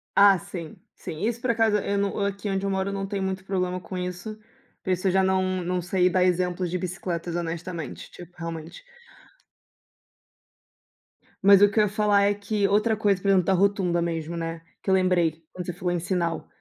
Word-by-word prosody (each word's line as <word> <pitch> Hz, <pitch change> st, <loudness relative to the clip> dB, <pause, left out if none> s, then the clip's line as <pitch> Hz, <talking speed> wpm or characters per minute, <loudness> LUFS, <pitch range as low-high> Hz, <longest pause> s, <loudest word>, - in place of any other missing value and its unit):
Ah, 200 Hz, -1 st, +7 dB
sim, 190 Hz, -2 st, -8 dB, 0.2 s
sim. 160 Hz, -2 st, -7 dB
Isso 235 Hz, +1 st, -1 dB
por 255 Hz, -, +1 dB
acaso 225 Hz, -2 st, +3 dB
eu 200 Hz, 0 st, -1 dB
não 200 Hz, 0 st, -1 dB
aqui 200 Hz, 0 st, -3 dB
onde 195 Hz, 0 st, -1 dB
eu -, -, 0 dB
moro, 190 Hz, 0 st, -1 dB
não 195 Hz, 0 st, -3 dB
tenho 195 Hz, -1 st, -3 dB
muito 190 Hz, 0 st, -3 dB
problema 185 Hz, -2 st, -1 dB
com 185 Hz, +1 st, -7 dB
isso. 180 Hz, +4 st, -5 dB, 0.5 s
Por 185 Hz, -, -1 dB
isso 185 Hz, +1 st, 0 dB
eu 185 Hz, -, +3 dB
já 190 Hz, 0 st, +3 dB
não 185 Hz, -1 st, +1 dB
não 180 Hz, +1 st, -1 dB
sei 180 Hz, +1 st, +2 dB
dar 180 Hz, +1 st, +2 dB
exemplos 180 Hz, 0 st, 0 dB
de 180 Hz, -, 0 dB
bicicletas, 175 Hz, -1 st, -4 dB
honestamente, 170 Hz, -2 st, -5 dB
tipo, 175 Hz, 0 st, -13 dB
realmente. 165 Hz, -, -7 dB, 2.6 s
Mas 200 Hz, 0 st, +7 dB
o 205 Hz, -, +7 dB
que 205 Hz, -, 0 dB
eu 215 Hz, -, +6 dB
ia 205 Hz, -, +1 dB
falar 205 Hz, -1 st, +3 dB
é 205 Hz, 0 st, +3 dB
que 205 Hz, 0 st, -1 dB
outra 215 Hz, +2 st, +2 dB
coisa, 200 Hz, -3 st, +1 dB
por 200 Hz, -, -3 dB
exemplo, 190 Hz, -3 st, +4 dB
da 195 Hz, -, +3 dB
rotunda 190 Hz, -2 st, +2 dB
mesmo, 165 Hz, -1 st, -3 dB
né, 165 Hz, 0 st, -4 dB, 0.2 s
que -, -, -4 dB
eu -, -, +5 dB
lembrei 175 Hz, -4 st, +2 dB
quando 180 Hz, -1 st, -6 dB
você 180 Hz, -, -4 dB
falou 175 Hz, +1 st, -2 dB
em 175 Hz, -, 0 dB
sinal, 170 Hz, -1 st, -2 dB
185 Hz, 200 wpm, -25 LUFS, 175-200 Hz, 2.6 s, Ah